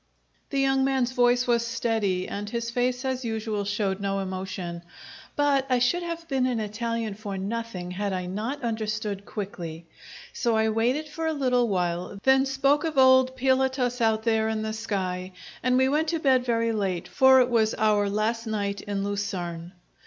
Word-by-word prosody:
The 275 - -1
young 270 0 +3
man's 265 -2 +1
voice 245 -1 +3
was 235 -2 +2
steady, 225 -5 -1
and 205 +1 -5
his 235 0 -3
face, 245 +2 -1
as 260 0 -2
usual, 220 -2 -2
showed 200 -1 -1
no 195 0 -1
emotion, 185 -2 -4 0.5
but 280 -2 +2
I 255 - +3
should 250 +9 +2
have 335 -1 -5
been 265 -4 +1
an 245 -3 -1
Italian 220 +1 -3
for 200 -1 -6
nothing 195 -3 -4
had 200 +2 -2
I 185 -1 -2
not 220 +10 -4
understood 215 -3 -3
quickly. 170 -5 -6 0.5
So 235 -3 +1
I 220 0 +2
waited 245 +8 0
for 320 +2 -4
a 320 - 0
little 250 -4 +2
while, 180 -1 -2
then 265 +1 +4
spoke 275 +2 +2
of 320 -3 -3
old 260 0 +5
Pilatus 260 -1 +1
out 220 -1 +2
there 220 -1 +2
in 220 -1 -2
the 220 0 -3
sky, 185 -4 -3 0.3
and 255 0 +2
we 260 0 +4
went 300 +4 +1
to 330 +1 0
bed 260 -4 +3
very 230 -1 +1
late, 195 -5 -2
for 265 0 +6
it 250 -1 +3
was 220 -2 +2
out 210 -1 +2
last 225 +3 -1
night 200 -2 -2
in 200 -1 -3
Lucerne. 180 -4 -4
225 Hz, 180 wpm, -26 LUFS, 200-260 Hz, 0.5 s, for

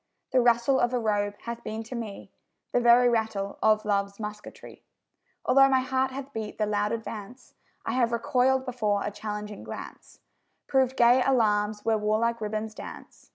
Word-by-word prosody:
The 255 - +4
rustle 240 +2 +3
of 240 +1 +1
a - - +1
robe 205 -2 0
hath 235 0 -6
been 220 +1 -5
to 225 - -9
me 225 -4 -7 0.4
The - - +2
very 240 +1 +6
rattle 220 -4 -1
of 215 0 +3
love's 200 -1 -1
musketry; 210 -1 -9 0.6
Although 270 +1 +6
my 260 -1 +3
heart 260 0 0
hath 275 +1 -8
beat 220 -1 -5
the 215 - +1
loud 210 0 0
advance, 225 +1 -7 0.3
I - - -1
have 240 -2 +1
recoiled 255 +3 +1
before 215 -6 -1
a 210 - -3
challenging 210 0 -6
glance, - - -10 0.5
Proved 265 -1 +1
gay 240 +2 +5
alarms 210 -5 +1
where 220 -1 +2
warlike 220 +2 0
ribbons 215 +1 -3
dance. - - -11
225 Hz, 165 wpm, -27 LUFS, 210-250 Hz, 0.6 s, very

